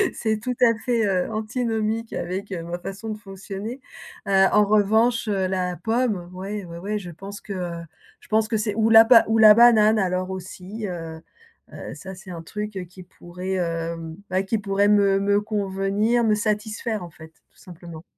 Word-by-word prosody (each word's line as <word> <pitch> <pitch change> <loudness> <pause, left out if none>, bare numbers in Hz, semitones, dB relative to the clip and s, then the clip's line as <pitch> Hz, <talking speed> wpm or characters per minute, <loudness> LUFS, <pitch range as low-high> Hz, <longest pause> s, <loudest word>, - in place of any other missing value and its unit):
C'est 220 -1 -1
tout 250 +3 -3
à 230 -2 +6
fait 235 -3 +1
,heu, 190 +1 0
antinomique 220 0 -2
avec, 190 +3 -4
heu, 170 -3 -4
ma 170 +1 -5
façon 200 +5 -7
de 215 - -4
fonctionner. 200 +4 -8 0.5
Heu, 195 -1 +5
en 210 0 +5
revanche, 220 +3 +2
heu, 195 -2 0
la 180 -1 -2
pomme, 220 -4 -1
oui, 195 +2 -5
oui, 170 0 -9
oui, 210 +2 -2
je 175 -3 -9
pense 195 +5 -9
que 200 - -7 0.7
je - - -20
pense 220 0 +2
que 220 -1 0
c'est 210 -1 -2
ou 225 0 +2
la 225 0 +8 0.2
ou 225 0 +2
la 215 -1 +9
banane 220 -2 +6
alors 185 -1 -1
aussi, 190 +3 -7
heu 165 -2 -6 0.5
heu, - - -8
ça, 190 0 -9
c'est 185 0 -11
un 165 -1 -7
truc, 210 +3 -6
heu, - - -3
qui 180 +1 -13
pourrait, 180 +1 -7
hem, 165 -2 -3
bah, 185 +1 0
qui 220 +3 -1
pourrait 200 0 +1
me 200 0 +3
convenir, 205 +2 0
me 215 -1 +3
satisfaire, 215 0 -2
en 170 - -8
fait, 160 0 -14 0.2
tout - - -32
simplement. 170 -3 -11
200 Hz, 185 wpm, -23 LUFS, 185-220 Hz, 0.7 s, la